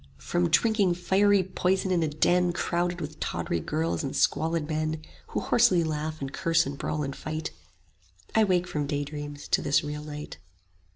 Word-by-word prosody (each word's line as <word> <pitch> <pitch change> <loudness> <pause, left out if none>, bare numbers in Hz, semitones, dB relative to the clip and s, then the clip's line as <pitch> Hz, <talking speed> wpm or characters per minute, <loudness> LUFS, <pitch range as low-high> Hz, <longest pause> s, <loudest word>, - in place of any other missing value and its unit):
From 85 0 0
drinking 210 -6 +3
fiery 195 +2 +3
poison 190 +1 0
in 175 -2 +2
a 160 - +2
den 175 +4 +2
Crowded 175 0 -1
with 155 -1 -6
tawdry 85 - -2
girls 155 - -1
and 135 - -3
squalid 160 -1 +1
men, 155 0 -1 0.3
Who - - -2
hoarsely 195 -8 +4
laugh 155 0 -3
and 135 0 -4
curse 165 0 +2
and 140 +1 -4
brawl 150 +1 -2
and 135 -1 -4
fight: 155 +1 -4 0.8
I 220 - +5
wake 180 -2 +2
from 150 -5 -2
daydreams 145 0 -4
to - - +3
this 140 +2 +2
real 150 0 -5
night. 150 0 -7
155 Hz, 170 wpm, -27 LUFS, 150-180 Hz, 0.8 s, I